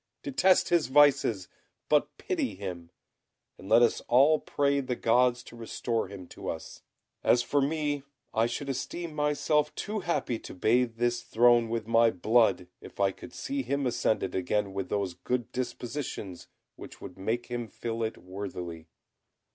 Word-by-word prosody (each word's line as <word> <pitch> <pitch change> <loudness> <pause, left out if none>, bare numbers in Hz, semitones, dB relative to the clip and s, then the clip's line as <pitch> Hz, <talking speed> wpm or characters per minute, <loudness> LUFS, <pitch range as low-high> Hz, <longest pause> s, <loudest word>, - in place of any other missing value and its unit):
Detest 190 -13 +3
his 170 -5 +3
vices, 130 -8 +4 0.4
but 150 -1 +2
pity 320 -9 -2
him, 90 -4 -6 0.7
and 95 - -10
let 115 +2 +6
us 115 - +2
all 140 +6 +5
pray 140 0 +1
the 130 -2 -2
gods 125 +1 +2
to - - -13
restore 115 -1 -2
him 95 -1 -9
to - - -8
us. - - -7 0.4
As 120 - +4
for 145 +2 +1
me, 145 0 0 0.3
I 115 +1 +3
should 130 +4 -4
esteem 155 +5 -4
myself 150 0 +1
too 215 +1 -3
happy 150 - -1
to - - -10
bathe 115 +5 +2
this 120 +1 0
throne 120 0 +4
with 115 -1 -2
my 115 +1 +4
blood, 110 -1 +2 0.2
if - - -13
I 100 -1 +3
could 110 - -12
see 275 0 -3
him 140 - -1
ascend 120 -2 +1
it 95 - -3
again 100 +2 -1
with 95 -1 -4
those 100 -3 -1
good 120 +7 -3
dispositions 120 -6 -5 0.3
which - - -11
would 90 - -10
make 115 +5 -1
him 120 -1 -4
fill 115 +2 -5
it 110 0 -2
worthily." 90 -4 -7
120 Hz, 165 wpm, -29 LUFS, 105-145 Hz, 0.7 s, let